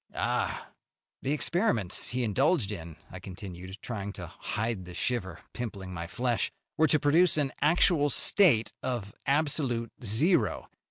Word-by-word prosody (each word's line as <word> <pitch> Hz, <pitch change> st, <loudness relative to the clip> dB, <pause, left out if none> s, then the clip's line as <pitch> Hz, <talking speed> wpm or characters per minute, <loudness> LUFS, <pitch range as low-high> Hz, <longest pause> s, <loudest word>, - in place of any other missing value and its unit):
"Ah!" -, -, -2 dB, 0.5 s
"The 135 Hz, -, -2 dB
experiments 150 Hz, -, 0 dB
he 125 Hz, +1 st, -1 dB
indulged 125 Hz, -, +2 dB
in," 85 Hz, -5 st, -7 dB, 0.2 s
I 95 Hz, -, -8 dB
continued, 95 Hz, 0 st, -9 dB
trying 100 Hz, -4 st, -5 dB
to 90 Hz, -, -7 dB
hide 105 Hz, +4 st, -4 dB
the 90 Hz, 0 st, -10 dB
shiver 95 Hz, -8 st, -2 dB
pimpling 100 Hz, -6 st, -6 dB
my 85 Hz, -1 st, -5 dB
flesh, 120 Hz, +5 st, -1 dB, 0.2 s
"were 160 Hz, 0 st, +4 dB
to 150 Hz, +1 st, +3 dB
produce 155 Hz, +4 st, +4 dB
an 140 Hz, -3 st, +1 dB
actual 150 Hz, 0 st, +4 dB
state 140 Hz, -, +5 dB
of 120 Hz, -6 st, -3 dB
absolute 135 Hz, -5 st, +1 dB
zero. 115 Hz, -, +1 dB
120 Hz, 140 wpm, -29 LUFS, 95-145 Hz, 0.5 s, state